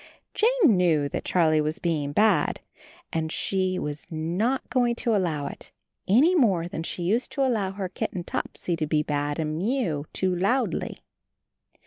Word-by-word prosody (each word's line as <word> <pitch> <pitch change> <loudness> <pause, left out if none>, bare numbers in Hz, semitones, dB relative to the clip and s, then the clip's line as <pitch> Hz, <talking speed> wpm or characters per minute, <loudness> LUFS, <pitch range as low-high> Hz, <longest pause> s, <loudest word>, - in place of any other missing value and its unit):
Jane 435 - +4
knew 160 -5 +3
that - - -4
Charlie 160 -3 +3
was 155 +1 -2
being 155 -4 -1
bad, 215 +8 +3 0.5
and 160 -1 -1
she 185 0 0
was 150 -2 -4
not 175 +11 -1
going 245 -2 +2
to 235 -1 +1
allow 165 -7 0
it, - - -8 0.4
any 270 - +5
more 195 - +3
than 170 - -5
she 175 +1 -4
used 220 +8 0
to 275 - +1
allow 210 -7 0
her 195 -1 -3
kitten 180 0 -4
Topsy 175 0 -3
to 155 -2 -1
be 150 0 +1
bad 145 -1 -2
and 155 -1 -2
mew 185 - -1
too 185 -1 0
loudly. 220 +9 0
180 Hz, 160 wpm, -26 LUFS, 155-225 Hz, 0.5 s, any